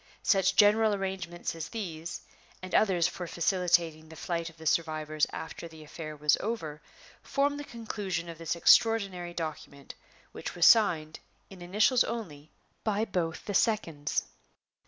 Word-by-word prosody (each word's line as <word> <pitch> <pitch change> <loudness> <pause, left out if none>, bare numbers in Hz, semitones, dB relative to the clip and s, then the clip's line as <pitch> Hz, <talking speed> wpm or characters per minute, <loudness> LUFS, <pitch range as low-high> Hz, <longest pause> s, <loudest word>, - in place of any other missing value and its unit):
Such 195 -1 +3
general 210 +1 +5
arrangements 190 -3 -4
as 165 -1 -6
these, 170 -7 -5 0.4
and 185 0 -9
others 180 -6 +3
for 180 0 -6
facilitating 170 -3 +1
the 160 - -11
flight 170 0 -3
of 165 - -19
the 160 - -12
survivors 155 -1 0
after 160 +1 -7
the 160 -1 -13
affair 155 0 -8
was 150 0 +3
over, 160 -9 -4 0.4
formed 285 +1 0
the - - -5
conclusion 205 -8 -4
of 165 -1 -9
this 165 0 -2
extraordinary 185 -2 +3
document, 150 -4 -6 0.4
which - - -7
was 175 -1 +3
signed, 165 -9 +4 0.3
in 190 -2 -12
initials 210 +8 +3
only, 155 -11 -6 0.3
by 215 0 0
both 175 -6 -3
the 205 - -4
seconds. 170 -9 0
175 Hz, 145 wpm, -29 LUFS, 160-205 Hz, 0.4 s, general